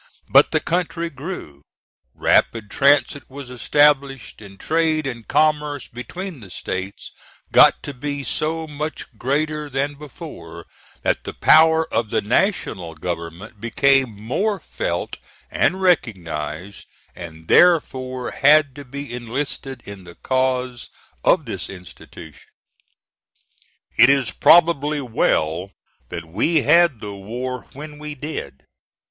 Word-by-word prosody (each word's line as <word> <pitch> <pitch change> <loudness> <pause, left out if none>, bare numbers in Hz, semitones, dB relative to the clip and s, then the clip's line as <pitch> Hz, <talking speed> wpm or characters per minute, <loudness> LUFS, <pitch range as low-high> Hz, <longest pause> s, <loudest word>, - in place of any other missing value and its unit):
But - - +6
the - - +1
country 170 -1 -2
grew, 135 - -8 0.5
rapid 110 -3 +1
transit 145 +1 +2
was 135 -1 -9
established, 135 +1 +1
and 100 -2 -13
trade 160 -2 +1
and 120 -4 -6
commerce 150 -2 +1
between 175 +7 -7
the 100 -5 -12
States 95 +2 -6 0.4
got - - +6
to 145 - -6
be 145 +2 -4
so 160 +3 -2
much 150 -4 -6
greater 150 +3 -1
than 140 +2 -1
before, 145 -1 -10 0.4
that - - 0
the - - -7
power 160 +1 +5
of 115 -1 0
the - - +1
National 100 - 0
government 85 +6 -6
became 130 -2 +2
more 190 - -1
felt - - -4 0.3
and 190 +1 +1
recognized 90 - -1 0.3
and, 80 -2 -10
therefore, 130 -7 +3
had 145 -1 +4
to 145 - -8
be 140 0 -7
enlisted 130 +2 -5
in 100 -2 -10
the 85 -1 -13
cause 130 -1 -1 0.3
of - - +3
this - - -5
institution. 80 -3 -12 1.5
It 125 - +7
is 135 -4 +2
probably 150 -3 +4
well 90 - 0 0.4
that 85 -1 -6
we 145 - +1
had 160 -5 +4
the 105 -1 -6
war 120 +6 -6
when 150 +1 -9
we 150 0 -7
did. 130 - -7
135 Hz, 120 wpm, -21 LUFS, 105-150 Hz, 1.5 s, It